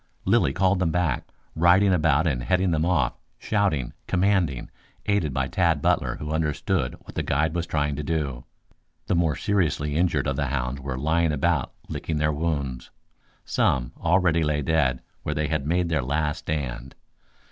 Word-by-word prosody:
Lilly 65 - +3
called 95 +5 +2
them 90 -3 +1
back, 80 -6 0 0.3
riding 90 +4 +5
about 80 -2 +3
and 70 -7 0
heading 90 +8 +1
them 80 -1 +1
off, 90 -5 +2 0.2
shouting, 95 - 0
commanding, 90 -8 +1 0.3
aided 100 -8 +1
by 65 0 -1
Tad 85 -1 +2
Butler - - +1
who 75 0 -6
understood 75 -5 -1
what - - -12
the - - -1
guide 80 +3 0
was 85 0 -2
trying 75 -2 0
to 75 - -3
do. 70 -6 -2 0.6
The - - 0
more 85 -4 +2
seriously 80 -7 0
injured 85 +1 +1
of 70 -1 -1
the 70 - 0
hounds 65 0 -2
were 65 -1 -4
lying 80 +4 +1
about 70 -2 0
licking 80 - -3
their 75 0 +1
wounds. 70 -5 -2 0.6
Some 60 -2 +1
already 85 -1 +2
lay 75 -1 0
dead 65 -5 +1 0.2
where 75 - -3
they 75 -1 -1
had 75 -3 -1
made 85 +2 +1
their 80 -3 +1
last 75 +5 -1
stand. 65 -4 -4
75 Hz, 170 wpm, -25 LUFS, 70-85 Hz, 0.6 s, riding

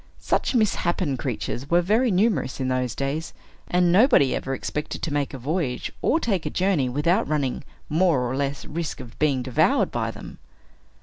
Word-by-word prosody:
Such - - -1
misshapen 180 - +1
creatures 130 +1 -4
were 175 +1 +4
very 225 +7 +2
numerous 200 - +1
in 130 -1 -1
those 125 -2 -1
days; 140 +4 -3 0.3
and 180 -1 +3
nobody 190 - +5
ever 135 0 -3
expected 150 +3 -5
to 160 - -2
make 145 -1 -1
a 135 - -6
voyage, 135 -1 -2
or 320 - +2
take 195 - -1
a - - 0
journey, 180 -9 +1
without 170 - +1
running 145 -4 -1 0.2
more 165 -3 +2
or 125 - -2
less 140 0 -2
risk 165 0 -4
of 120 - -11
being 140 -4 +2
devoured 130 -2 +2
by - - -1
them. - - -10
150 Hz, 175 wpm, -24 LUFS, 135-180 Hz, 0.3 s, nobody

